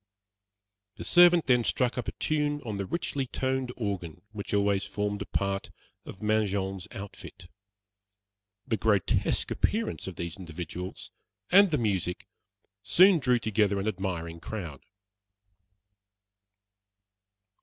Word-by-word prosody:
The - - -7
servant 175 -1 +6
then 125 -2 +4
struck 125 +1 +1
up 125 - -4
a - - -1
tune 150 -1 0
on 105 -3 -3
the 100 -1 -3
richly 145 - -2
toned 130 0 -1
organ 95 -7 -4
which 105 -2 -6
always 100 -1 +2
formed 105 0 -3
a - - -5
part 100 0 -2 0.4
of 100 - -10
Mangin's 100 -3 0
outfit. 95 -3 -9 1.2
The 110 - 0
grotesque 100 -1 +1
appearance 220 - -1
of 95 - -6
these 85 +1 -5
individuals, 90 0 -7 0.4
and 200 +2 +7
the 155 - +1
music, 95 -7 -1 0.6
soon 185 -1 +6
drew 125 -3 +3
together 105 -2 +1
an 100 - -2
admiring 90 -5 -3
crowd. 85 -8 -6
105 Hz, 120 wpm, -28 LUFS, 95-125 Hz, 1.2 s, and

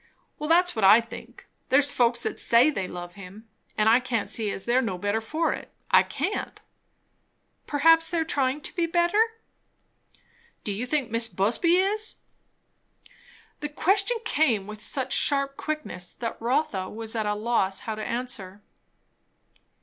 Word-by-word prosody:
"Well, 300 +1 -4
that's 355 0 +4
what 220 - -2
I 200 +4 +8
think. 230 0 -10 0.2
There's 285 +2 +5
folks 235 -2 +1
that - - -3
say 240 +6 +4
they 195 -9 -3
love 175 -1 -8
him, 195 +4 -12 0.3
and 215 - +2
I 230 +3 +6
can't 240 -4 -2
see 220 -2 0
as 195 - -5
they're 245 +2 +2
no 200 -7 -3
better 205 +4 -1
for 310 +9 -1
it. - - -9 0.2
I - - +7
can't." 410 - -4 1.1
"Perhaps 325 +3 +4
they 340 +1 -2
are 325 - 0
trying 275 -2 0
to - - -5
be 340 -2 0
better." 345 +5 +2 1.4
"Do 210 - -3
you 220 +6 -4
think 275 -5 -1
Mis' 230 0 +1
Busby 230 - +1
is?" 415 +4 0 1.4
The 295 - -4
question 390 +9 +1
came 250 - +1
with 210 +1 -9
such 260 +3 -2
sharp 275 -1 +1
quickness 305 - -5
that 230 -2 -6
Rotha 230 -6 -1
was 225 +1 -4
at 220 -2 -1
a 210 - 0
loss 210 -3 0
how 220 - -4
to 215 0 -6
answer. 215 -6 -4
240 Hz, 160 wpm, -26 LUFS, 215-310 Hz, 1.4 s, I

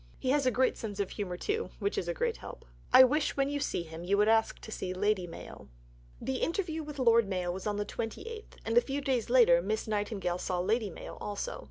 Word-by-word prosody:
He 255 - 0
has 280 -2 +2
a - - +7
great 255 +2 +2
sense 210 -3 -6
of 200 - -1
humour, 185 -4 -4
too, 435 - -2
which 405 - -1
is - - -2
a - - 0
great 480 -2 -1
help. - - -10 0.3
I 255 +1 +10
wish, 285 +4 +2
when 275 0 +2
you 290 0 -1
see 180 - -1
him, 160 +1 -9
you 195 +3 +1
would 210 +1 +4
ask 225 0 +3
to 220 - -9
see 185 -3 -4
Lady 200 -1 +1
Mayo. 165 - -10 0.5
The 265 - -2
interview 330 -1 -1
with 300 -1 -8
Lord 230 -4 +4
Mayo 180 -2 -1
was 190 +3 -5
on 205 -1 -1
the 205 - -1
28th, 430 - -6
and 230 +1 +5
a - - -2
few 275 +3 -3
days 260 -5 0
later 230 -9 +6
Miss 215 +5 -2
Nightingale 205 -4 -1
saw 180 -1 -2
Lady 210 +4 +1
Mayo 170 - -9
also. 210 - -4
225 Hz, 235 wpm, -31 LUFS, 195-275 Hz, 0.5 s, I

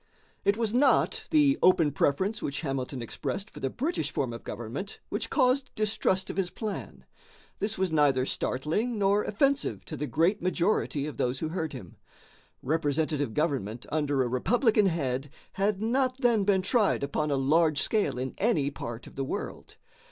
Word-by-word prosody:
It 200 +1 +2
was 225 -2 -1
not 290 - +3
the 295 -2 +4
open 170 -5 +5
preference 190 +10 0
which 140 0 -3
Hamilton 135 -4 -3
expressed 195 - -4
for - - -10
the 135 - -1
British 260 - -2
form 130 -4 -2
of 115 - -8
government 120 - -6
which - - -3
caused 265 -1 +2
distrust 205 -3 0
of - - -10
his 190 -2 0
plan. 215 0 -6 0.5
This 205 +2 -1
was 190 -2 0
neither 140 -4 +3
startling 165 - -1
nor 200 +1 +3
offensive 275 +6 0
to 155 - -6
the 150 0 -3
great 170 +9 +2
majority 175 -5 0
of 150 - -6
those 125 +1 0
who 155 +3 -3
heard 160 -3 -3
him. 100 -10 -10 0.7
Representative 145 -3 0
government 125 -8 -1
under 145 -3 +1
a - - -1
republican 215 - +3
head 140 -5 -1 0.2
had 200 +1 0
not 255 +2 +1
then 230 -5 +3
been 190 -2 +3
tried 210 - +2
upon 150 +2 -1
a 140 - +1
large 155 +2 +3
scale 215 - 0
in 130 0 -3
any 175 -11 +2
part 120 -3 -7
of - - -13
the 135 - -2
world. 135 - -6
165 Hz, 170 wpm, -28 LUFS, 140-215 Hz, 0.7 s, open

